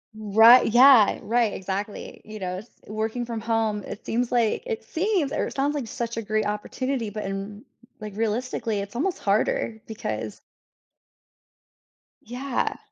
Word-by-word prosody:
Ri 220 +3 +6
yeah. 245 -2 +7
Right, 230 -2 +1
exactly. 195 +2 -5
You 215 0 -9
know, 185 -1 -3
s 215 +5 -10 0.2
working 220 +3 -3
from 230 -2 -5
home, 220 -2 0
it 205 - -9
seems 240 +1 -1
like 235 - +1
it 460 -2 -4
seems 350 -5 0
or - - -1
it - - -9
sounds 285 +2 0
like 270 -6 -3
such 235 -1 -4
a - - -1
great 215 0 0
opportunity, 230 +3 -2
but 215 +1 -5
in 195 +3 -5 0.4
r 215 - -5
like, 205 - -9
realistically, 225 -1 -1
it's 200 +3 -6
almost 350 +8 -1
harder, 215 +2 0
because 110 - -5 1.8
Yeah. 250 +3 -3
225 Hz, 155 wpm, -25 LUFS, 210-245 Hz, 1.8 s, yeah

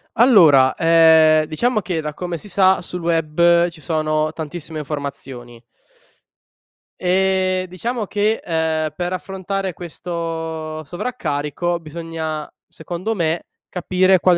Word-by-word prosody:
Allora, 165 - +6
ehm, 160 -1 +5
diciamo 215 +9 0
che 175 -3 -2
da 150 -1 -5
come 175 -2 -4
si 205 - -11
sa 190 0 +3
sul 180 0 -6
web 170 +1 +3
ci 170 -2 -15
sono 155 -1 -1
tantissime 160 0 -6
informazioni 135 -5 -7 1.4
e 185 0 +1
diciamo 225 +4 -3
che, 210 +3 0
ehm, 160 -2 0
per 175 +3 -3
affrontare 190 +1 -3
questo 165 -2 -5
sovraccarico 170 - -3
bisogna, 160 -1 -5 0.2
secondo 180 +7 -5
me, 165 -1 -1 0.3
capire 185 +1 +2
quale 180 0 +4
170 Hz, 115 wpm, -20 LUFS, 155-185 Hz, 1.4 s, Allora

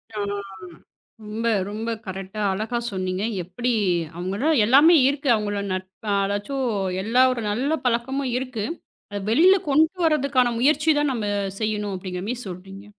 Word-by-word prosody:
ஆ. - - -4 1.1
ரொம்ப, 215 +2 -4 0.2
ரொம்ப 220 +2 -4 0.2
கரெக்டா 195 +2 -6
அழகா 215 +5 -2
சொன்னீங்க. 185 0 -2 0.2
எப்படி? 210 +8 -3 0.5
அவங்கட்ட 195 - -2 0.2
எல்லாமே 285 +8 +7
இருக்கு. 280 0 -2
அவங்களோ 205 -2 -1
நட்ப் 185 +3 -7 0.2
அதாச்சும் 205 +7 -2 0.4
எல்லா 230 +5 +2
ஒரு 240 -2 -3
நல்ல 270 +9 0
பழக்கமும் 250 +2 0
இருக்கு. 250 -5 -4 0.5
அத 205 - -4
வெளியில 350 +11 +6
கொண்டு 310 +5 +3
வர்றதுக்கான 280 -6 +2
முயற்சி 295 +5 +3
தான் 295 -1 +1
நாம 215 -4 -2 0.3
செய்யணும் 210 -2 -2
அப்படிங்கற 180 0 -6
மாரி 245 +1 -3
சொல்றீங்க. 195 +2 -9
225 Hz, 135 wpm, -23 LUFS, 200-270 Hz, 1.1 s, எல்லாமே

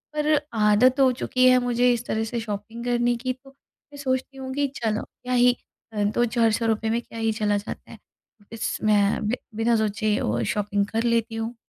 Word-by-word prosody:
पर 300 0 +2 0.2
आदत 225 +5 +4
हो 260 -1 +5
चुकी 255 0 +3
है 255 - +6
मुझे 245 0 +3
इस 240 0 -4
तरह 220 0 -1
से 235 +1 -3
शॉपिंग 220 +2 -6
करने 240 0 +1
की 255 +2 -2
तो 270 +2 -19
मैं 285 +1 -20
सोचती 265 0 -2
हूँ 260 0 -6
कि 285 +1 +1
चलो 215 -1 0
क्या 250 0 -7
ही 245 0 +5 0.4
अ, 210 - 0
2 215 +4 +2
400 230 -1 +1
रुपए 220 0 0
में 230 +1 0
क्या 230 - -10
ही 225 0 +1
चला 205 -1 +2
जाता 205 - -8
है। - - -10 0.6
बस 225 - -2
मैं 210 0 +2
बि 230 - +1 0.2
बिना 230 +1 +2
सोचे 215 0 0
वो 120 +2 0
शॉपिंग 205 -1 0
कर 225 +2 -1
लेती 230 -1 0
हूँ। 225 +2 -4
230 Hz, 205 wpm, -24 LUFS, 215-250 Hz, 0.6 s, है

